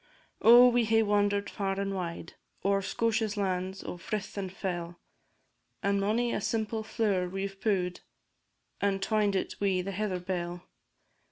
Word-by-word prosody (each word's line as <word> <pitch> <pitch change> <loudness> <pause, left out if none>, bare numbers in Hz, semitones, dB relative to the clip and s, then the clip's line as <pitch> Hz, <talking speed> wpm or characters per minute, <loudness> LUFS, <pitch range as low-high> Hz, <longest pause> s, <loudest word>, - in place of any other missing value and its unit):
Oh, 240 +2 +9
we 240 -1 +3
hae 225 0 +4
wander'd 205 -1 +1
far 195 -1 -2
and 195 0 -1
wide, 170 -3 -5 0.3
O'er 200 0 +3
Scotia's 220 +1 0
lands 190 -1 -2
o' - - -6
frith 210 +4 -4
and 195 -2 -4
fell! 175 -3 -4 0.8
And 200 0 +2
mony 230 +4 +1
a - - -1
simple 220 +1 -1
flower 205 -5 0
we 195 +1 -3
've 195 0 -8
pu'd, 185 -4 0 0.8
And 200 -1 +1
twined 210 -1 +1
it 190 - -3
wi' 190 -2 +2
the 195 - -4
heather 195 -1 -2
bell. 175 -1 -4
200 Hz, 155 wpm, -29 LUFS, 185-215 Hz, 0.8 s, Oh